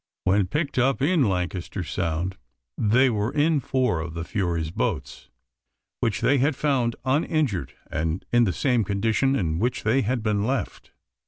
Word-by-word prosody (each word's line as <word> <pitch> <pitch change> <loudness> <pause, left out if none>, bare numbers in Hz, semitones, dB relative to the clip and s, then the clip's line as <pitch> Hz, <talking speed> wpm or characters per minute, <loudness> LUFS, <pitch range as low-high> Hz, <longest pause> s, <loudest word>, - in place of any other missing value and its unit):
When 95 0 +2
picked 145 - -1
up 130 +1 +2
in 145 - +3
Lancaster 90 +1 -3
Sound, 85 +1 -2 0.4
they 115 +5 +3
were 110 -1 0
in 150 +1 +2
four 130 - 0
of 80 +1 -5
the 85 - -3
Fury's 85 -3 -2
boats, - - -3 0.7
which 115 - -1
they 140 0 +3
had 140 +3 +2
"found 130 -5 +1
uninjured, 140 - 0 0.2
and 80 +2 -2
in 120 0 +5
the 95 - +1
same 125 +2 +1
condition 110 +7 +1
in 80 -8 -1
which 120 +3 -1
they 120 +6 +3
had 120 0 -1
been 105 -2 +1
left." 130 +4 -3
110 Hz, 160 wpm, -25 LUFS, 90-135 Hz, 0.7 s, in